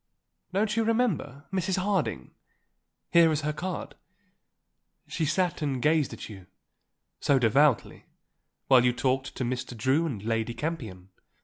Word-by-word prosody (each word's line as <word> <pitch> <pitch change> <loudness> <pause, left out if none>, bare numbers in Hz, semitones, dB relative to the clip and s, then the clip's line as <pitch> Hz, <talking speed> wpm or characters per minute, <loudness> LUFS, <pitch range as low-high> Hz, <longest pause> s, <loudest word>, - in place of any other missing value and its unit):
"Don't 210 +3 0
you 230 - +2
remember? 220 - -1
Mrs. 190 0 0
Harding. 185 - -1 0.8
Here 170 -1 +6
is 155 -1 0
her 150 +1 -1
card. 180 +3 -5 1.1
She 160 - -2
sat 180 +3 0
and 140 -4 -1
gazed 150 +1 +2
at - - -8
you, 95 -4 -11 0.7
so 140 - +3
devoutly, 130 +2 +2 0.6
while 130 -2 +6
you 125 0 +3
talked 130 +2 -1
to - - -3
Mr. 125 0 -4
Drew 135 +8 +2
and 110 -10 -5
Lady 115 +1 -1
Campion. 110 - -5
145 Hz, 135 wpm, -27 LUFS, 125-170 Hz, 1.1 s, Here